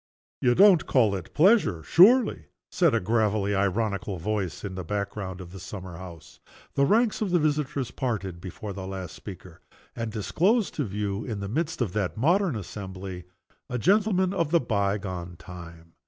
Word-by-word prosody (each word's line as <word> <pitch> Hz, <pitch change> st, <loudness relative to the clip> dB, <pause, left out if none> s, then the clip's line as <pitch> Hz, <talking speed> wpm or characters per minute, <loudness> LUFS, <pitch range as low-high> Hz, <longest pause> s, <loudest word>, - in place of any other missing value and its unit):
'" -, -, -85 dB
"You 125 Hz, -1 st, +3 dB
don't 195 Hz, -5 st, +6 dB
call 115 Hz, -6 st, +3 dB
it 95 Hz, -4 st, -5 dB
pleasure, 155 Hz, -, +4 dB
surely?" 215 Hz, -, +5 dB, 0.3 s
said 170 Hz, -8 st, +3 dB
a -, -, +3 dB
gravely 105 Hz, -1 st, +1 dB
ironical 100 Hz, 0 st, -1 dB
voice 95 Hz, 0 st, -3 dB
in 100 Hz, -2 st, -5 dB
the 95 Hz, 0 st, -5 dB
back 100 Hz, +3 st, -2 dB
ground 95 Hz, -3 st, -6 dB
of 90 Hz, -2 st, -9 dB
the 95 Hz, -, -9 dB
summer 95 Hz, -1 st, -8 dB
house. 85 Hz, -2 st, -11 dB, 0.3 s
The 140 Hz, 0 st, +3 dB
ranks 225 Hz, -, +2 dB
of 210 Hz, -, 0 dB
the 175 Hz, -, +3 dB
visitors 145 Hz, -5 st, -1 dB
parted 95 Hz, -10 st, -3 dB
before 95 Hz, +3 st, -7 dB
the 95 Hz, -1 st, -6 dB
last 95 Hz, -2 st, -6 dB
speaker, 90 Hz, -3 st, -11 dB, 0.3 s
and 115 Hz, -1 st, -3 dB
disclosed 185 Hz, -, +1 dB
to 145 Hz, -, -2 dB
view, 100 Hz, 0 st, -3 dB
in 110 Hz, -5 st, -4 dB
the 100 Hz, -, -4 dB
midst 155 Hz, +7 st, -2 dB
of 105 Hz, -7 st, -1 dB
that 105 Hz, -1 st, -2 dB
modern 170 Hz, -, +2 dB
assembly, 95 Hz, -3 st, -7 dB, 0.4 s
a 125 Hz, -, -2 dB
gentleman 190 Hz, -, +2 dB
of 170 Hz, -6 st, 0 dB
the 170 Hz, +1 st, +4 dB
bygone 100 Hz, -, -2 dB
time. 85 Hz, -2 st, -11 dB
105 Hz, 175 wpm, -26 LUFS, 95-150 Hz, 0.4 s, don't